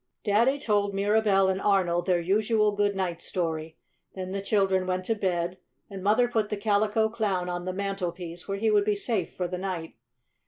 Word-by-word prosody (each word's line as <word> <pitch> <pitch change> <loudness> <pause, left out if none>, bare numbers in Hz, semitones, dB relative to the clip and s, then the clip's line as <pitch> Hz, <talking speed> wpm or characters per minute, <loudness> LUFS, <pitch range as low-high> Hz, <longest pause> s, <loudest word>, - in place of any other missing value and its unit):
Daddy 230 +7 +3
told 205 -6 0
Mirabell 200 -1 +3
and 190 0 0
Arnold 180 -3 +2
their 180 -2 +3
usual 210 +4 +2
good 205 0 0
night 180 -3 -2
story. 160 -3 -3 0.4
Then 185 -1 -5
the 195 0 -2
children 195 -2 +1
went 185 0 -1
to 225 - +1
bed 180 -3 -2 0.3
and 195 -1 -6
Mother 220 +5 +4
put 220 -3 0
the 210 - -2
Calico 210 +1 +2
Clown 205 -5 -1
on 175 0 -4
the 185 - -1
mantelpiece 180 -3 -4
where 195 0 -2
he 220 +2 +1
would 205 -1 +4
be 210 0 +1
safe 200 -3 -2
for 180 - -2
the 180 +1 -4
night. 180 -4 -4
195 Hz, 190 wpm, -27 LUFS, 180-210 Hz, 0.4 s, Mother